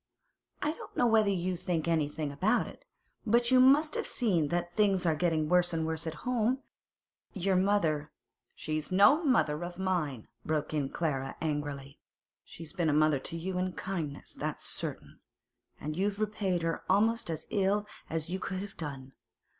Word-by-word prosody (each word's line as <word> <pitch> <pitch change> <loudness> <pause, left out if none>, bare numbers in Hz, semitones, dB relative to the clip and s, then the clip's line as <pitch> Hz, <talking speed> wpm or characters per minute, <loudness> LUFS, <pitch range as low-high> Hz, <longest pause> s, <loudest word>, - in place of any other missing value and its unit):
I 300 - +1
don't 320 - -11
know 245 - +4
whether 220 -3 +4
you 185 -1 0
think 170 -2 -2
anything 155 -2 0
about 205 +12 +2
it, - - -12 0.4
but 235 +2 +3
you 255 - +7
must 285 +4 +5
have - - 0
seen 185 - +1
that 175 +2 -2
things 195 -3 +3
are 165 - +4
getting 155 -1 +1
worse 175 +1 +3
and 160 -1 0
worse 160 0 -2
at 160 -1 -6
home. 250 0 +1 0.8
Your 190 0 +1
mother—' 170 -6 +2 0.5
'She's 155 +1 -3
no 240 - +6
mother 175 - +2
of 175 0 -6
mine!' 170 - -1 0.2
broke 155 -1 -1
in 145 -3 0
Clara 135 -5 -2
angrily. 145 -3 -3 0.4
'She's 165 0 -10
been 175 -4 +1
a - - +2
mother 155 -1 +4
to 165 - -5
you 180 +2 -3
in 185 0 -1
kindness, 165 -7 -5
that's - - -4
certain, - - -4 0.6
and 150 +1 -4
you've 200 +3 -1
repaid 200 -5 -1
her 165 0 -1
almost 220 +1 +3
as 160 -1 -4
ill 205 +1 +1 0.2
as 160 -1 -2
you 190 - -2
could 190 0 -4
have 200 0 -8
done. 135 -4 -6
175 Hz, 170 wpm, -30 LUFS, 155-200 Hz, 0.8 s, you